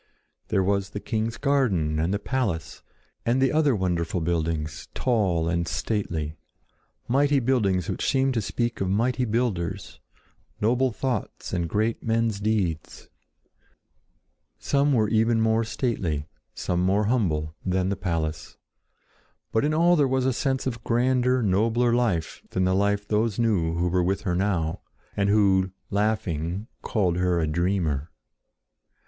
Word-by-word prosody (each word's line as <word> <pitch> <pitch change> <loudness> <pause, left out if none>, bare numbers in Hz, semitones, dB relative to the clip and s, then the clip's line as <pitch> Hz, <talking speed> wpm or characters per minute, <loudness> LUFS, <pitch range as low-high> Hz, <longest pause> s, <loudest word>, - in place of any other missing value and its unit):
There 95 - +1
was 100 0 0
the 100 - -5
king's 110 +2 -2
garden 105 - +1
and 80 +3 0
the 100 - +1
palace, 105 -7 -2 0.4
and 120 +3 +1
the 130 -1 +3
other 150 -4 +3
wonderful 90 -2 -1
buildings, 80 -2 -2
tall 95 -10 +1
and 85 0 0
stately—mighty 105 - -2
buildings 105 -9 +1
which - - -1
seemed 135 0 +2
to 115 - 0
speak 120 +3 -2
of 95 - 0
mighty 125 +6 +1
builders, 110 -7 -2 0.6
noble 125 +4 +2
thoughts 125 -1 -3
and 85 -3 -1
great 110 +5 0
men's 115 -2 0
deeds. 100 -7 -2 1.5
Some 140 +1 +1
were 110 -4 +3
even 115 +1 +2
more 110 0 +2
stately, 95 - -2 0.3
some 90 0 -1
more 100 +3 +2
humble, 80 -10 0
than 95 0 0
the 100 - 0
palace. 80 -5 -3 0.9
But 110 - +1
in 150 - +2
all 170 +3 +4
there 145 -4 +3
was 130 0 +1
a 130 - +2
sense 130 +2 -1
of 115 -3 -3
grander, 125 +1 +2
nobler 115 +5 +2
life 110 -10 0
than 95 - 0
the 95 0 +2
life 100 +1 +1
those 105 0 0
knew 95 -9 +1
who 85 +1 0
were 90 +1 +1
with 95 +2 0
her 90 -4 -1
now, 85 -4 0 0.3
and 100 0 +1
who, 95 -3 +3 0.2
laughing, 100 -3 -1 0.2
called 90 -6 0
her 90 -1 +1
a 80 - +1
dreamer. 80 -2 0
100 Hz, 140 wpm, -25 LUFS, 85-120 Hz, 1.5 s, all